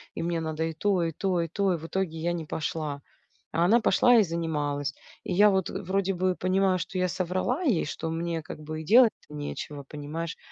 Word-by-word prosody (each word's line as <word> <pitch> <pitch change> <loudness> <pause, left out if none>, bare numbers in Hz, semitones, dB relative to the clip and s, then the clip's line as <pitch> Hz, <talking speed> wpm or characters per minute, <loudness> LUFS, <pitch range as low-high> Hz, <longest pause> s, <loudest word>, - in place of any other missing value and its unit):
и 165 - -3
мне 170 -1 -1
надо 160 0 -2
и 160 0 -2
то, 185 +1 +1
и 165 - 0
то, 185 +2 -1
и 165 - -1
то". 195 +2 +1
И - - -1
в 160 - -9
итоге 170 -2 -2
я 170 +2 -1
не 165 -2 -4
пошла, 150 -1 -3 0.5
а 165 +2 +2
она 225 +6 +5
пошла 245 +2 +5
и 215 - +6
занималась. 150 -5 -2 0.3
И - - -3
я 205 +3 +6
вот 190 -2 +1
вроде 195 0 -1
бы 185 0 0
понимаю, 185 0 +2
что 185 - -4
я 185 0 +2
соврала 185 - -1
ей, 240 - +2
что 160 +2 -4
мне 165 0 -2
как 155 - -9
бы 155 +1 -5
и - - -9
делать-то 225 -4 +4
нечего, 145 0 -5
понимаешь, 150 +4 -5
170 Hz, 215 wpm, -27 LUFS, 160-190 Hz, 0.5 s, и